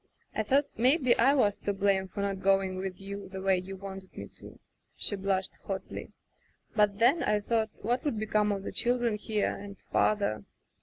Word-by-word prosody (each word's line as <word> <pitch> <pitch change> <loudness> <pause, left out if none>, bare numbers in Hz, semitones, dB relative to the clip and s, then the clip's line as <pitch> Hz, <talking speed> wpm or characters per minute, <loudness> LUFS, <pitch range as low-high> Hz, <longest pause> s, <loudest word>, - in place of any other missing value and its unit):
I - - 0
thought 270 +7 +3
maybe 255 +1 +4
I 270 +5 +5
was 205 -7 +3
to 205 - -2
blame 195 -1 +1
for 195 +2 -5
not 200 -1 -1
going 195 -1 +2
with 185 -1 -4
you, 200 0 -7
the 190 0 -6
way 190 -1 +2
you 190 +2 -7
wanted 190 -1 -9
me - - -5
to/' - - -13 0.4
she 205 - -1
blushed 195 -1 -1
hotly, 190 -1 -5 0.6
"but 210 -2 +3
then, 250 +9 +4
I 210 0 +2
thought, 220 +1 0
what 240 +6 0
would 290 -8 -1
become 210 -1 +1
of 195 -1 -2
the - - -4
children 240 -1 +1
here, 210 0 -1
and 200 0 -9
father 200 - +2
205 Hz, 190 wpm, -30 LUFS, 195-220 Hz, 0.6 s, I